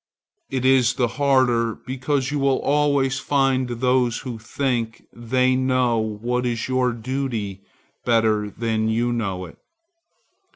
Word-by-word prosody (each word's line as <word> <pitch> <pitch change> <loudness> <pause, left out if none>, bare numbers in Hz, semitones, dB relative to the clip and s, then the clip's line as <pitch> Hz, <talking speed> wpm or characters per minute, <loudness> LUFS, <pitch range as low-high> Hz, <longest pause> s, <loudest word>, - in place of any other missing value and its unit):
It 130 -1 -2
is 130 -2 +4
the 125 -2 +1
harder 130 -5 +2
because 130 +1 -2
you 145 - -1
will 135 -1 +2
always 140 -2 +1
find 135 -3 +1
those 125 -1 +1
who 120 -3 -5
think 120 -1 -2
they 125 +2 +1
know 130 -2 +1
what 110 +3 -2
is 120 -2 -2
your 130 -1 +1
duty 115 -5 -4 0.4
better 110 -3 +2
than 110 0 -1
you 120 +2 0
know 95 -6 -3
it. 85 - -14
125 Hz, 130 wpm, -22 LUFS, 115-130 Hz, 0.4 s, is